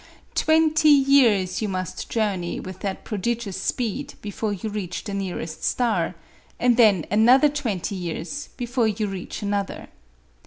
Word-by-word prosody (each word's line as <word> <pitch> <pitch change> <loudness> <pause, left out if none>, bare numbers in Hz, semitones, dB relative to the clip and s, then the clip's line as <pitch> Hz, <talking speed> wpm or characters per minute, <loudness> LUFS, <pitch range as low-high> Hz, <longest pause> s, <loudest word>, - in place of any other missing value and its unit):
Twenty 315 -1 +3
years 265 -10 +4
you 215 - -1
must 185 -2 -4
journey 200 -6 -1
with 185 0 -8
that 195 -2 -4
prodigious 220 -1 -3
speed 235 -5 -2
before 210 +1 -3
you 205 +2 -4
reach 190 -4 -4
the 205 - -5
nearest 180 -5 -4
star, 215 -9 0 0.4
and 245 -1 +4
then 210 -9 +5
another 245 +8 +6
twenty 230 - -3
years 180 - -5
before 245 -2 0
you 215 0 -1
reach 195 +1 -6
another. 200 -1 -3
210 Hz, 140 wpm, -24 LUFS, 190-245 Hz, 0.4 s, another